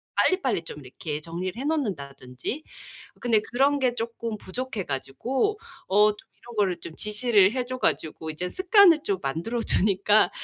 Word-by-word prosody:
빨리빨리 270 - +2
좀 150 - -9
이렇게 150 +3 -5
정리를 175 +6 -5
해 270 - -4
놓는다든지. 160 - -3 0.6
근데 225 -3 +3
그런 275 +3 +3
게 250 -2 +1
쪼끔 230 -1 -4
부족해 235 +1 -4
가지고 250 - -1 0.3
어 210 +2 +5
쫌 - - -29 0.2
이런 240 -1 -13
거를 190 -4 +1
쫌 160 - -8
지시를 210 -2 +3
해 255 -1 0
줘 255 +1 -4
가지고 160 -9 -1
이젠 175 +4 -4
습관을 375 - +6
쫌 195 -2 0
만들어 170 - -2
주니까 205 +1 +3
210 Hz, 330 characters per minute, -26 LUFS, 170-255 Hz, 0.6 s, 습관을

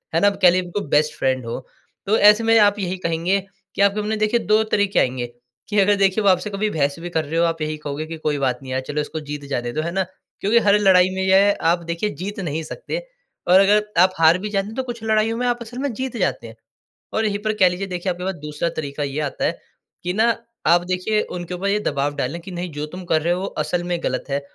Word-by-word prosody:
है - - +4
ना? 205 - +6
कह 195 -2 +4
लीजिए 180 +1 +2
बिल्कुल, 180 +3 -4
बेस्ट 150 +1 +2
फ्रेंड 130 -2 0
हो। 115 - -4 0.5
तो 210 +3 +2
ऐसे 210 +2 +6
में 225 0 +4
आप 205 0 +4
यही 185 -1 -2
कहेंगे 170 +2 0 0.4
कि - - 0
आपके 200 +1 +3
मन 210 - -4
में 220 0 -1
देखिए 215 +3 +2
2 215 0 +2
तरीके 205 -2 +1
आएँगे 125 -1 0 0.4
कि 210 -1 +2
अगर 205 +1 +4
देखिए, 195 +1 +2
वो 200 - +5
आपसे 185 +2 +2
कभी 205 +1 -1
बहस 145 -6 0
भी 175 +1 -6
कर 160 -2 -1
रहे 160 +3 -2
हो 170 - +4
आप 165 -1 -2
यही 155 0 -2
कहोगे 150 0 -5
कि 165 +1 -7
कोई 150 -2 -1
बात 130 -3 0
नहीं 130 - -8
यार 130 0 -1
चलो 150 +1 -1
इसको 155 +2 -5
जीत 145 -1 -5
जाने 120 -3 -2
दो, 155 - -1
है 170 +2 -3
ना? 190 +2 0 0.4
क्योंकि 220 +4 +4
हर 205 +1 +5
लड़ाई 185 -2 +5
में 190 - -2
यह 195 +2 +4
आप 170 0 -1
देखिए 170 +5 -1
जीत 205 +1 -5
नहीं 160 -3 -3
सकते - - -5 0.5
और 180 +2 +7
अगर 205 +2 +4 0.2
आप 185 0 +4
हार 165 +1 +6
भी 210 +3 -4
जाते 195 -1 -1
हैं, 220 - -8
तो 260 - -1
कुछ 240 -3 -7
लड़ाइयों 220 +1 +1
में 250 - -1
आप 240 0 +1
असल 235 +1 -8
में 280 0 -1
जीत 255 +1 -4
जाते 180 - -1
हैं। 110 - -12 0.6
और 220 - +1
यहीं 205 -1 0
पर 215 - +2
कह 185 - +7
लीजिए 180 +2 -4
देखिए, 180 0 -3
आपके 180 +1 -7
पास 190 +1 -2
दूसरा 150 +2 -2
तरीका 145 -1 -4
ये 140 +1 -2
आता 145 -2 -3
है - - 0 0.4
कि 180 - -1
ना 225 +4 +2 0.3
आप 175 0 +5
देखिए 185 +4 0
उनके 175 0 -5
ऊपर 190 +3 -2
ये 205 +1 +1
दबाव 145 -5 -1
डालें 145 +7 -2
कि 190 - -9
नहीं 175 0 -5
जो 150 +1 -4
तुम 180 +4 -9
कर 160 -2 +2
रहे 170 +2 +1
हो, 180 - -1
वो 195 - -2
असल 175 -2 -2
में 175 0 -1
गलत 130 0 -1
है 140 +1 0
185 Hz, 265 wpm, -21 LUFS, 155-205 Hz, 0.6 s, और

